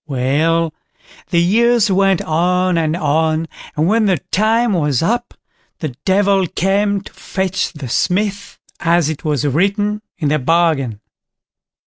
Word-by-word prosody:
Well, 155 +5 0 0.6
the 175 - 0
years 225 +4 +3
went 195 -1 +2
on 180 +3 +1
and 160 -1 0
on, 160 0 0 0.3
and 155 - +2
when 215 +3 +2
the 185 -3 +2
time 225 +3 +2
was 150 -6 0
up, 240 +6 -1 0.4
the 155 - -4 0.2
Devil 195 -1 +2
came 200 +3 0
to - - -14
fetch 190 -1 -2
the 150 -5 -8
Smith, 200 - -1 0.2
as 170 -3 +2
it 155 - -8
was 150 -4 -1
written 200 - 0 0.2
in 150 -4 -1
their 150 +1 +1
bargain. 140 -7 +1
175 Hz, 135 wpm, -17 LUFS, 155-200 Hz, 0.6 s, years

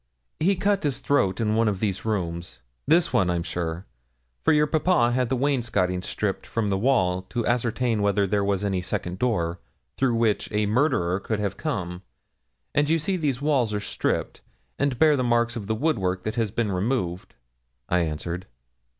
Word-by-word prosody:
'He 190 +5 +3
cut 200 +1 +1
his 145 -3 -1
throat 100 -10 +1
in 110 -2 +1
one 115 +1 +3
of 100 -3 0
these 100 -2 -2
rooms 85 -5 -3 0.3
this 170 +3 +3
one, 95 -2 +3
I'm 85 -1 0
sure 85 +1 -4 0.6
for - - +4
your 150 -1 +4
papa 155 -6 +2
had 125 -1 +1
the 130 - +1
wainscoting 115 -9 0
stripped 100 +1 -3
from 110 -3 -1
the 95 - +1
wall 95 -7 +2
to 120 -2 -2
ascertain 120 -1 0
whether 100 0 +2
there 100 +1 +1
was 100 0 0
any 95 -2 0
second 90 -2 -3
door 90 -8 0 0.4
through 130 -3 +2
which 115 -3 +1
a 105 0 +1
murderer 105 - +1
could 110 +1 -2
have 100 -2 -2
come; 95 - -3 0.7
and 145 0 +2
you 165 - +4
see 190 +5 -1
these 145 -6 -1
walls 130 -8 +2
are - - 0
stripped, 105 - -2 0.4
and 140 -3 +1
bear 155 +2 +5
the 130 - 0
marks 120 -1 +2
of 105 -4 -5
the 110 - 0
woodwork 95 - 0
that 110 - -2
has 115 -3 0
been 110 0 -1
removed,' 95 - -2 0.5
I 90 - +2
answered. 85 +2 -3
110 Hz, 185 wpm, -25 LUFS, 95-130 Hz, 0.7 s, bear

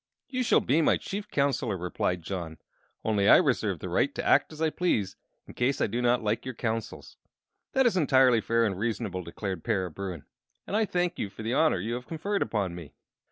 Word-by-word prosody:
"You 255 -1 -1
shall 245 - +4
be 150 +6 +2
my - - +3
Chief 205 +1 -6
Counselor," 135 -7 0
replied 90 0 -2
John; 85 -3 -5 0.5
"only 105 -2 +2
I - - +9
reserve - - +1
the - - -6
right - - 0
to - - -3
act - - +4
as 155 - -11
I 160 -1 +1
please 105 - 0 0.3
in - - -12
case 130 +3 0
I - - +3
do 120 +4 -2
not 120 -1 +2
like 105 +1 0
your 130 -2 -6
counsels." 115 -1 -4 0.6
"That 265 0 +3
is 235 - +3
entirely 130 -7 +4
fair 115 +1 +2
and 95 -4 -2
reasonable," 110 -4 -2
declared 90 +1 -5
Para 95 -6 -1
Bruin, 90 -4 -6 0.4
"and - - -4
I 220 0 +3
thank 175 -2 -1
you 100 - -2
for 110 - -10
the 115 +2 -1
honor 155 - +3
you 110 +6 -3
have 125 +1 -5
conferred 195 +5 -2
upon 100 -5 -1
me." 85 -4 -10
115 Hz, 210 wpm, -28 LUFS, 95-150 Hz, 0.6 s, I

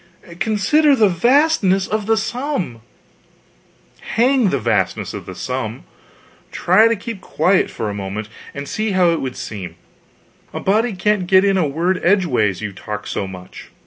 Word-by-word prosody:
Consider 275 +9 +3
the 215 -5 +4
vastness 215 - +3
of 215 -1 -3
the 225 0 +3
sum 240 - -3 0.6
" - - -33
"Hang 250 -2 +3
the 140 - 0
vastness 110 -7 -1
of - - -8
the - - -7
sum! - - -4 0.7
Try 200 +6 +4
to 230 - +1
keep 210 -1 -7
quiet 190 0 +1
for 110 - -4
a 105 - -3
moment, 100 +1 -5 0.3
and 140 0 -6
see 215 +4 -2
how 180 -2 +4
it 165 - -1
would 130 -2 -4
seem; 95 -6 -7 0.8
a - - -4
body 220 +4 +1
can't 195 0 0
get 190 +1 +5
in 195 -1 +3
a 180 -5 +2
word 175 +6 -1
edgeways, 135 - +2
you 105 -2 -4
talk 105 +2 -6
so 100 - -3
much. 90 -1 -11
185 Hz, 165 wpm, -19 LUFS, -, 0.8 s, get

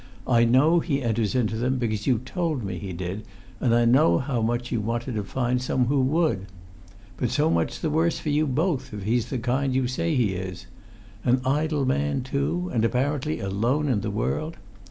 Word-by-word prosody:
I 120 -1 +4
know 140 +8 +4
he 140 -5 -1
enters 115 -1 0
into 115 -3 +1
them, 125 +3 0
because 110 -4 -2
you 130 -3 +4
told 150 - -2
me 95 -3 -4
he 95 0 -6
did, 90 +4 -5 0.4
and 115 -2 +2
I 120 0 +4
know 115 -8 +5
how 130 -3 -1
much 120 +2 -1
you 115 - 0
wanted 120 +3 -2
to 105 -2 -2
find 125 +3 -1
some 125 0 -1
one 125 - +3
who 140 -1 +3
would. 130 - +1 0.7
But 125 - 0
so 150 +6 +2
much - - -1
the 160 - 0
worse 165 +2 +2
for 150 - -4
you 150 +1 +2
both, 145 - -1
if 100 - -6
he's 115 +3 0
the 130 - -2
kind 130 +3 0
you 130 -1 +2
say 155 +6 -1
he 115 -7 +2
is. 90 -1 -6 0.6
An 125 +1 +3
idle 150 +1 +1
man, 140 0 0
too, 145 +7 -2
and 115 -3 +1
apparently 125 - 0
alone 115 +10 0
in 120 -7 +1
the 105 - -2
world! 155 +10 -2
125 Hz, 205 wpm, -25 LUFS, 110-145 Hz, 0.7 s, know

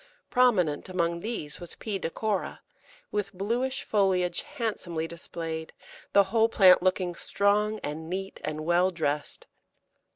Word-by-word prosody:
Prominent 190 -13 +3
among 170 -2 0
these 170 -8 -4
was 175 -1 -5
P. 205 -3 -4
decora, 200 +4 -2 0.5
with 205 -1 -1
bluish 235 +8 -1
foliage 185 -4 +1
handsomely 175 -8 -3
displayed, 165 -1 -6 0.4
the 200 - +6
whole 225 +3 +2
plant 185 -5 +7
looking 185 -1 +1
strong 210 +4 +1
and 160 +2 -5
neat 195 +2 -4
and 155 0 -4
well 175 +2 +4
dressed. 150 -4 -3
185 Hz, 125 wpm, -28 LUFS, 170-210 Hz, 0.5 s, plant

